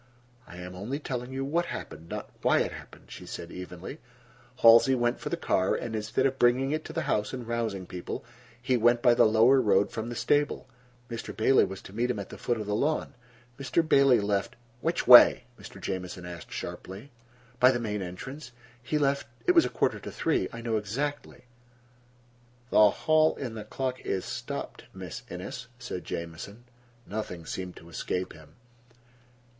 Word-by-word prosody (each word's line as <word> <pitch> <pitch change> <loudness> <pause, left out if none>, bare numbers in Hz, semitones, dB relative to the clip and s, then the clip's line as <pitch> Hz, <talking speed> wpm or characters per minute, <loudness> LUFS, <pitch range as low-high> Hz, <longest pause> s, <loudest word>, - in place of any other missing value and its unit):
"I 85 - -11
am 90 0 -8
only 105 +10 -4
telling 125 -4 -5
you 135 +1 -3
what 170 +5 0
happened, 85 +1 -7
not - - -6
why - - +4
it - - -1
happened," - - -12
she - - -9
said 85 - -7
evenly. 90 -1 -8 0.6
"Halsey 115 +3 +8
went 120 -1 0
for - - -5
the - - -2
car, 95 0 +1
and 115 -2 -4
instead 110 0 0
of 135 0 0
bringing 125 +3 +3
it 155 - -1
to - - -7
the - - -2
house 105 +2 -1
and 125 -3 -6
rousing 115 -5 -2
people, 90 0 -6 0.3
he 125 +1 +1
went 120 +1 +3
by 120 - +6
the 120 - +5
lower 115 +5 +5
road 100 -3 +3
from 115 +1 -4
the 120 - -5
stable. 145 +4 +1 0.4
Mr. 115 -2 -7
Bailey 125 +4 +5
was 95 0 -8
to 95 - -12
meet 120 +3 0
him 125 - -1
at 100 - -6
the - - -9
foot 120 -2 -1
of 105 - -4
the 105 - -2
lawn. 145 +7 0 0.5
Mr. 155 +4 0
Bailey 135 -4 +5
left—" 100 +4 -1 0.2
"Which 165 +6 -1
way?" 125 0 +9 0.2
Mr. 100 - -11
Jamieson 90 -1 -5
asked 85 -3 -9
sharply. 100 +9 -7 0.5
"By 125 - +7
the 125 -2 +1
main 105 -3 -3
entrance. 120 +9 -8 0.3
He 140 +5 -1
left—it 140 - 0
was 335 -2 +5
a - - -1
quarter - - 0
to - - -8
three. 160 - 0
I 115 - -7
know 115 -1 0
exactly." 140 +8 -4 1.3
"The - - +3
clock 155 +8 +2
in 125 -4 -5
the 110 -2 -8
hall 130 -2 -2
is 95 - -2
stopped, - - -6
Miss - - -7
Innes," 100 +7 -7
said 120 -7 -6
Jamieson. 85 +7 -6 0.4
Nothing 95 -6 -5
seemed 90 +1 -5
to 85 - -13
escape 90 +2 -3
him. 80 -1 -16
115 Hz, 180 wpm, -28 LUFS, 95-130 Hz, 1.3 s, way